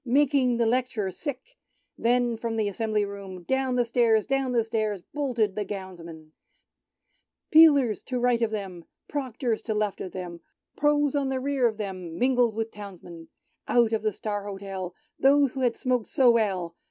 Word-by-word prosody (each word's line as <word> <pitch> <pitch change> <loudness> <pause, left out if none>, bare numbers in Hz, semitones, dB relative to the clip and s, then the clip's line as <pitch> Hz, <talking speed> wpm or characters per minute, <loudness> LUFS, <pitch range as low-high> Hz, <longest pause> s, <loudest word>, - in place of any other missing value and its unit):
Making 260 -1 +2
the 235 - +2
Lect'rer 235 -4 0
sick 290 - -7
— - - -43
Then 240 0 +2
from 225 0 -3
the 215 -2 0
Assembly 215 +1 0
Room, 195 -3 -8
Down 265 +4 0
the 245 -1 +2
stairs, 230 -2 +3
down 270 -1 0
the 235 -2 +2
stairs, 215 -4 -2
Boiled 285 -4 -2
the 210 -2 +1
Gownsmen! 170 -5 -8 1.2
Peelers 285 - +6
to 255 - -3
right 245 -1 +2
of 230 - +2
them. 190 -6 -6 0.2
Proctors 255 -5 -2
to 220 - -3
left 210 -2 -1
of 185 - -5
them, 175 -2 -7 0.4
Pro's 295 -1 +2
on 280 -2 0
the 265 -1 -1
rear 270 -2 +1
of 220 -2 -3
them. 185 -5 -6
Mingled 245 -3 +2
with 225 0 -3
Townsmen! 175 -5 -10 0.4
Out 235 -2 +3
of 220 - +1
the 215 0 0
"Star 205 0 -4
Hotel," 195 -2 -6 0.2
Those 280 -1 +4
who 265 - -6
had 245 -3 +1
smoked 250 -4 0
so 255 -3 +4
well. 190 -7 0
225 Hz, 175 wpm, -26 LUFS, 200-255 Hz, 1.2 s, Peelers